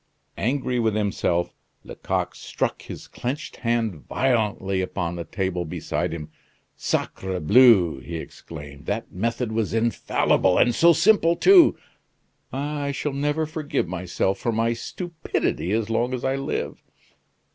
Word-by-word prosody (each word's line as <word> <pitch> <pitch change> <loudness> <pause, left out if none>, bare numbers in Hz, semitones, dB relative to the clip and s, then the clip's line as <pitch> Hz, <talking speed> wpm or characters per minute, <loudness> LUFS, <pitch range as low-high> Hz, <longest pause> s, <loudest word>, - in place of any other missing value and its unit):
'" - - -43
Angry 130 -2 -1
with 110 -2 +1
himself, 95 -4 0 0.3
Lecoq - - -3
struck - - -3
his - - -9
clenched 130 +4 -5
hand 115 -3 0
violently 105 -7 0
upon 85 -2 -3
the 85 - -4
table 90 +1 -2
beside 85 +1 -3
him. 80 -2 -6 0.4
"Sacrebleu!" 95 - +3
he 85 +5 -7
exclaimed, 75 -3 -9
"that - - -3
method 115 +4 -2
was 110 0 -1
infallible, 110 -4 +2
and 120 - +4
so 170 +8 +6
simple 170 -1 +4
too! 365 - +6 0.7
Ah! 145 +2 -3
I 140 - -1
shall 140 +1 -3
never 145 +3 0
forgive 155 - -2
myself 90 +2 -1
for 120 - -1
my 115 +1 +1
stupidity 160 - -3
as 110 0 0
long 120 +3 +1
as 125 - -5
I 135 0 +1
live!" 135 0 -3
115 Hz, 135 wpm, -24 LUFS, 90-135 Hz, 0.7 s, so